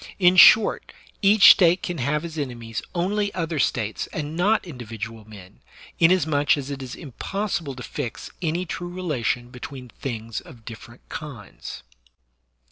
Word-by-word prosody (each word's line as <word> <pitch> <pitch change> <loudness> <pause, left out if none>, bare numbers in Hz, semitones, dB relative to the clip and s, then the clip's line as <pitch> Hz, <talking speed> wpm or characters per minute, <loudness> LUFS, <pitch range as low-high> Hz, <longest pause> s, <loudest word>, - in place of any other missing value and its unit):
In 180 -1 +5
short, 215 +4 +6 0.3
each 205 0 +8
State 175 0 +4
can 175 -2 -4
have 150 +5 -1
as 165 -2 -7
enemies 120 -6 -5
only 200 +4 0
other 165 -3 -2
States 110 -5 -1
and 150 0 -5
not 205 +5 +2
individual 115 - -8
men, 95 -4 -13 0.4
inasmuch 160 -5 +3
as 140 0 -5
it 140 -1 -5
is 130 0 -7
impossible 170 - -4
to 125 - -8
fix 130 -6 -6
any 170 +2 -1
true 175 +1 -5
relation 130 -9 -2
between 125 0 -9
things 115 -3 -5
of 115 -3 -15
different 115 +1 -12
kinds. 105 - -8
145 Hz, 140 wpm, -24 LUFS, 120-175 Hz, 0.4 s, each